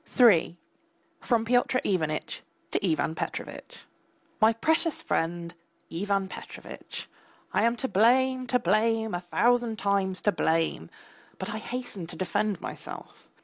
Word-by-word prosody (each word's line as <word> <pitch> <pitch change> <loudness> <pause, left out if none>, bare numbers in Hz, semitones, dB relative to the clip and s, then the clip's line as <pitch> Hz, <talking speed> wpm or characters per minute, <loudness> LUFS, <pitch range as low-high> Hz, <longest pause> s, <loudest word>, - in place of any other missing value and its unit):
III 180 -8 +6 0.6
(FROM 230 -2 +1
PYOTR 245 +2 +3
IVANITCH 155 -5 -1 0.3
TO - - 0
IVAN 160 -3 +1
PETROVITCH) - - -6 0.6
MY 220 +1 +6
PRECIOUS 320 +6 +1
FRIEND, 170 +1 -1 0.4
IVAN 195 +2 0
PETROVITCH, - - -8 0.5
I - - +3
am 235 +1 +3
to 265 - -1
blame, 255 +4 +3
to 250 - +3
blame, 220 +1 +1
a 175 - -2
thousand 235 +5 +2
times 195 -2 0
to 210 - +4
blame, 160 - 0 0.5
but 190 - -4
I 215 - -3
hasten 240 -7 -5
to - - -8
defend 205 +1 -1
myself. - - -8
210 Hz, 130 wpm, -28 LUFS, 175-240 Hz, 0.6 s, III